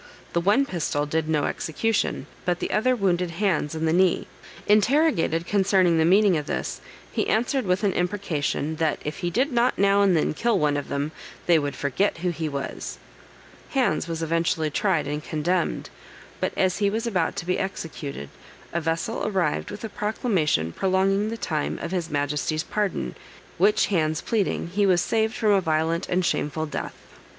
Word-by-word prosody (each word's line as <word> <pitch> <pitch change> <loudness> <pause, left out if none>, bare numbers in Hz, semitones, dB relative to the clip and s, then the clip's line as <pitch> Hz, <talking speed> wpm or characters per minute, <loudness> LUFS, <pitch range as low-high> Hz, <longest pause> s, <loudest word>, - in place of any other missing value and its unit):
The 170 - +2
one 210 +10 +3
pistol 155 - -1
did 155 +1 -1
no 150 -2 +2
execution, 220 +7 -1 0.2
but 180 -1 0
the - - -3
other 255 +4 +2
wounded 180 -5 +1
Hands 170 -4 0
in 160 0 -1
the 160 - +2
knee. 185 0 +3 0.4
Interrogated 210 - +3
concerning 190 -4 +3
the 160 - +4
meaning 195 +2 +5
of 150 -1 -4
this, - - -3 0.3
he - - -1
answered 245 +3 +1
with 180 +3 +1
an 200 - +2
imprecation, 170 -5 -1
"That 160 -2 +1
if 150 - -4
he 175 - -1
did 260 - +1
not 240 0 +2
now 200 0 +4
and 190 -4 +4
then 155 - +1
kill 230 +6 +1
one 150 -4 +2
of 145 - -3
them, 140 +2 -2 0.3
they 170 -2 +5
would 145 -2 -3
forget 145 +10 0
who 175 +1 -1
he 160 -2 -3
was." 140 -1 -5 0.8
Hands 195 -11 +1
was 165 -1 -3
eventually 165 -1 0
tried - - +1
and 150 +1 -3
condemned, 170 +3 -1 0.5
but - - 0
as 185 0 +1
he 200 -1 +3
was 225 +3 -2
about 185 -8 0
to - - -4
be 180 +1 0
executed, 155 - -5 0.4
a 170 - 0
vessel 165 +7 -2
arrived 185 -7 0
with 205 - -8
a - - -2
proclamation 195 - 0
prolonging 195 - +1
the 230 - -4
time 155 -8 -2
of 170 - -5
his 175 -3 -2
Majesty's 150 +2 -1
pardon, 190 - -2 0.5
which 210 +3 +4
Hands 160 -5 0
pleading, 205 -6 -1
he 200 +3 +2
was 180 -2 +4
saved 220 +1 0
from 215 -2 +2
a 195 -1 +4
violent 160 +1 0
and 180 0 +1
shameful 155 -1 -1
death. 150 - -5
175 Hz, 180 wpm, -25 LUFS, 155-200 Hz, 0.8 s, meaning